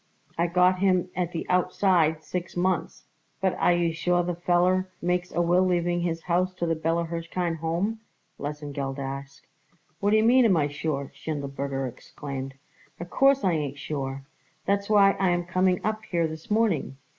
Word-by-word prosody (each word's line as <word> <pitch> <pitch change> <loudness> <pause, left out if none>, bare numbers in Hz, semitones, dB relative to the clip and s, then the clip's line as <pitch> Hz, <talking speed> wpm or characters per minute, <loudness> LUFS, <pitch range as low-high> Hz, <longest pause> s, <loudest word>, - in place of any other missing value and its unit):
I 170 +1 +1
give 180 +1 +3
him 185 -2 +2
at 180 -2 -1
the 170 - -4
outside 180 -3 +2
six 175 +3 -5
months." 185 -1 -1 0.3
"But 190 -1 +1
are - - +4
you 170 -1 +1
sure 175 +2 +1
the 175 0 -2
feller 180 +2 +2
makes 180 +1 -1
a 175 - +1
will 175 +2 +3
leaving 175 -1 +1
his 165 -1 -2
house 185 +1 0
to 170 - -2
the 165 - +1
Bella 165 +1 0
Hirshkind 165 +1 -3
Home?" 170 +8 -1 0.4
Lesengeld 145 -2 -4
asked. 135 0 -6 0.5
"What 205 - +1
d'ye 215 +1 +4
mean, 245 +2 +5
am 195 -6 +4
I 145 -2 +1
sure?" 145 -1 -3
Schindelberger 140 -2 -4
exclaimed. 135 +2 -7 0.4
"Of 175 +1 -7
course 275 0 +4
I 185 - +3
ain't 145 -4 -2
sure. 135 -2 -4 0.4
That's 200 0 0
why 200 -2 +6
I 190 -1 +3
am 175 0 +1
coming 185 0 +2
up 215 0 -1
here 170 -2 +1
this 160 0 -9
morning. 205 -11 +1
175 Hz, 170 wpm, -26 LUFS, 155-185 Hz, 0.5 s, why